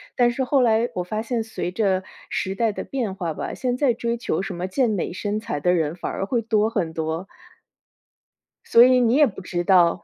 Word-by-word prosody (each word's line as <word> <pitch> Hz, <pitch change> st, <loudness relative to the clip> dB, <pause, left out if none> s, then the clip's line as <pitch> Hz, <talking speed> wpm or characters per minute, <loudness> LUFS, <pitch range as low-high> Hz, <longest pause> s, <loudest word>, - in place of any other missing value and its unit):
但 240 Hz, -1 st, +4 dB
是 260 Hz, +2 st, -1 dB
后 270 Hz, +2 st, +2 dB
来 230 Hz, 0 st, +3 dB
我 180 Hz, -, -2 dB
发 215 Hz, +4 st, -3 dB
现 230 Hz, 0 st, -2 dB
随 220 Hz, -5 st, -4 dB
着 190 Hz, -2 st, 0 dB, 0.3 s
时 190 Hz, -, -2 dB
代 225 Hz, +2 st, +1 dB
的 -, -, -5 dB
变 230 Hz, -8 st, -3 dB
化 170 Hz, -5 st, -3 dB
吧， -, -, -5 dB
现 250 Hz, -1 st, -2 dB
在 260 Hz, -3 st, +3 dB
追 235 Hz, 0 st, -2 dB
求 230 Hz, -8 st, -2 dB
什 195 Hz, -, -5 dB
么 180 Hz, +2 st, -3 dB
健 235 Hz, +5 st, +1 dB
美 195 Hz, -4 st, -2 dB
身 205 Hz, +3 st, -2 dB
材 220 Hz, -9 st, -4 dB
的 180 Hz, +4 st, +3 dB
人 160 Hz, -1 st, 0 dB
反 -, -, -5 dB
而 195 Hz, -, -3 dB
会 235 Hz, +3 st, 0 dB
多 220 Hz, -1 st, +1 dB
很 185 Hz, -8 st, -2 dB
多。 160 Hz, +3 st, -3 dB, 1.4 s
所 230 Hz, -, +7 dB
以 255 Hz, 0 st, +5 dB
你 240 Hz, +1 st, +3 dB
也 295 Hz, -, +6 dB
不 195 Hz, -4 st, -8 dB
知 175 Hz, -1 st, -3 dB
道。 175 Hz, -2 st, +4 dB
215 Hz, 240 characters per minute, -23 LUFS, 180-235 Hz, 1.4 s, 所